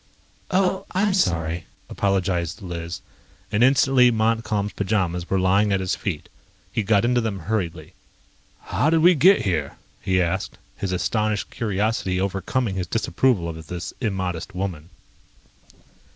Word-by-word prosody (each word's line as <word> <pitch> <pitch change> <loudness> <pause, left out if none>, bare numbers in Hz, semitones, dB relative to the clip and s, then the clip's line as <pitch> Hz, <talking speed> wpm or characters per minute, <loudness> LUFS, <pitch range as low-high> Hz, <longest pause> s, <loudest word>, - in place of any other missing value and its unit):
"Oh, 190 0 +1
I'm 195 +1 +2
sorry," 85 - 0 0.2
apologized 95 -2 -1
Liz, 85 -1 -5 0.5
and 105 +3 +3
instantly 130 -1 +5
Montcalm's 110 -2 0
pajamas 90 -4 -1
were 95 - +1
lying 100 +3 +3
at 95 - +2
his 95 -1 -1
feet. 85 -7 -4 0.5
He - - +1
got 105 +1 +2
into 120 0 +2
them 105 -5 -3
hurriedly. 95 -2 -3 0.7
"How 150 - 0
did 165 0 +3
we 175 +3 +7
get 185 +5 +5
here?" 80 -7 -1 0.2
he 95 -1 +1
asked, 90 +2 -1 0.2
his 95 - -3
astonished 105 +2 -1
curiosity 105 -3 -1
overcoming 100 +4 -1
his 90 -2 -2
disapproval 110 -2 +1
of 80 -1 -7
this 90 +1 -5
immodest 95 -5 -3
woman. 90 -4 -4
100 Hz, 135 wpm, -23 LUFS, 90-115 Hz, 0.7 s, we